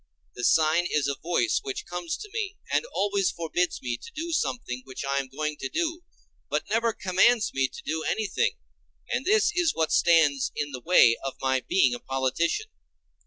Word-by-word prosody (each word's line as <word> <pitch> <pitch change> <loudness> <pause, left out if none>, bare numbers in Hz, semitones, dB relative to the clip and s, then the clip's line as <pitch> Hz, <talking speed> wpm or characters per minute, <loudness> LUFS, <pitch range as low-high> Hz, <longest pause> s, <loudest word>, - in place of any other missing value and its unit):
The 125 - -7
sign 160 +5 +3
is 150 -2 +1
a 140 - 0
voice 120 -10 +1
which 135 - -5
comes 175 -2 -4
to 420 - -9
me 410 -3 -3
and - - +1
always 200 -1 +1
forbids 170 +1 -2
me 120 -1 -2
to - - -12
do 335 +2 -4
something 240 - -2
which 130 +1 -7
I 140 0 0
am 135 - -4
going 150 +3 -4
to 135 - -4
do, 335 0 -2 0.5
but - - -1
never 230 +1 +2
commands 210 +4 +2
me 135 0 +2
to - - -11
do 160 +1 -2
anything, 220 - 0 0.6
and - - -1
this 425 +1 +4
is 350 -3 +2
what 160 -1 0
stands 155 -5 +4
in 145 -1 -3
the 130 -2 -6
way 120 -7 +5
of 135 - -4
my 130 0 +1
being 130 -2 +2
a 120 - -4
politician. 135 - -1
165 Hz, 190 wpm, -26 LUFS, 135-225 Hz, 0.6 s, way